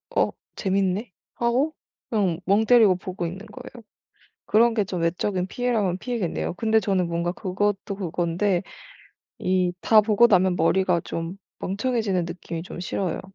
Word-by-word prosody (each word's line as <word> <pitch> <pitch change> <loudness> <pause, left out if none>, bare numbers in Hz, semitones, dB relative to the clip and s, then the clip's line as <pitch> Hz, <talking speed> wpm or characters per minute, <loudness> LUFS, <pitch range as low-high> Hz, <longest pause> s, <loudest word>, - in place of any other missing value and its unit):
'어 - - +3 0.3
재밌네?'하고 210 - -1 0.4
그냥 190 -7 0
멍 205 +3 +3
때리고 220 -6 +6
보고 180 -1 -5
있는 190 +5 -6
거예요. 225 +3 -11 0.6
그런 230 +2 +4
게 215 - +1
좀 180 -2 -4
외적인 180 +2 0
피해라면 215 -5 0
피해겠네요. 225 -9 -2
근데 220 +2 +2
저는 185 -4 +1
뭔가 170 +1 -1
그것도 200 +1 -2
그건데 175 +1 0 0.8
이 185 -1 +1
다 220 -1 +6
보고 215 +2 +4
나면 185 -4 +3
머리가 180 +1 +2
좀 165 +3 -4 0.2
멍청해지는 200 -3 -1
느낌이 170 -1 -6
좀 175 - -8
싫어요. 180 -1 -2
190 Hz, 310 characters per minute, -24 LUFS, 180-220 Hz, 0.8 s, 때리고